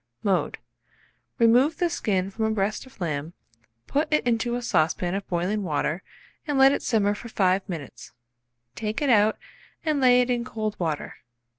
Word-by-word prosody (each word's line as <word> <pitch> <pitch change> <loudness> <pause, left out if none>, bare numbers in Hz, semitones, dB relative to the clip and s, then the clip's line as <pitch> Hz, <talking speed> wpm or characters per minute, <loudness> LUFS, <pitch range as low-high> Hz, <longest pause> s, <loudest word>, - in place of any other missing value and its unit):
Mode. 195 -3 0 0.8
Remove 245 +6 +4
the 350 - +2
skin 195 - -1
from 220 +2 -2
a - - +1
breast 215 +3 -1
of 260 - -19
lamb, 155 -2 -3 0.5
put 295 +3 -1
it 305 - +2
into 240 0 +1
a 245 - -3
saucepan 175 -3 +1
of 195 0 -3
boiling 180 +4 -1
water, 155 0 -1 0.5
and 290 -2 0
let 270 0 +7
it - - -1
simmer 205 -4 +1
for 235 +3 -9
5 190 -1 +1
minutes. 160 -7 -7 0.6
Take 215 +5 -3
it 275 - +3
out 215 -1 +4 0.5
and 305 -3 +1
lay 250 -1 +6
it 250 0 0
in 240 -1 0
cold 215 -3 -4
water. 160 -4 -3
215 Hz, 170 wpm, -25 LUFS, 185-245 Hz, 0.8 s, let